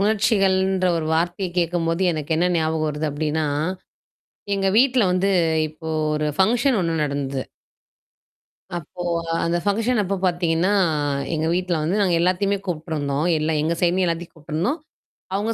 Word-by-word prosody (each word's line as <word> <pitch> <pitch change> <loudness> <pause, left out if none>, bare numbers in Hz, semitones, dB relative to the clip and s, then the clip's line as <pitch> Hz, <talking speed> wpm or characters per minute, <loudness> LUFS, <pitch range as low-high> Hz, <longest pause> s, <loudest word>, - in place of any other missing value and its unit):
உணர்ச்சிகள்ன்ற 195 -3 +2
ஒரு 160 -1 -2
வார்த்தைய 175 +3 -1
கேட்கும்போது 170 +1 0
எனக்கு 155 0 -3
என்ன 175 +2 +2
ஞாபகம் 160 -1 0
வருது 150 +1 -2
அப்பிடின்னா, 150 +1 -1 1.1
எங்க 195 0 0
வீட்ல 255 -2 +4
வந்து 190 +2 +1 0.4
இப்போ 160 +1 -9 0.3
ஒரு 150 0 -1
ஃபங்க்ஷன் 240 +5 +3
ஒன்னு 165 -1 0
நடந்தது. 140 -2 -3 1.4
அப்போ, 175 +3 -9 0.4
அந்த 170 +1 +1
ஃபங்க்ஷன் 225 +3 +1
அப்ப 195 +1 -1
பார்த்தீங்கன்னா, 175 +1 +1 0.6
எங்க 155 0 -1
வீட்ல 180 -1 0
வந்து 180 +6 0
நாங்க 180 -3 +2
எல்லாத்தையுமே 195 +3 +1
கூப்பிட்டுருந்தோம், 155 -3 -2
எல்லா 155 +1 0
எங்க 165 +2 0
சைட்லயும் 180 +2 +3
எல்லாத்தையும் 170 0 -3
கூப்பிட்டுருந்தோம், 165 - -2 0.5
அவுங்க 210 +3 0
175 Hz, 130 wpm, -22 LUFS, 160-195 Hz, 1.4 s, வீட்ல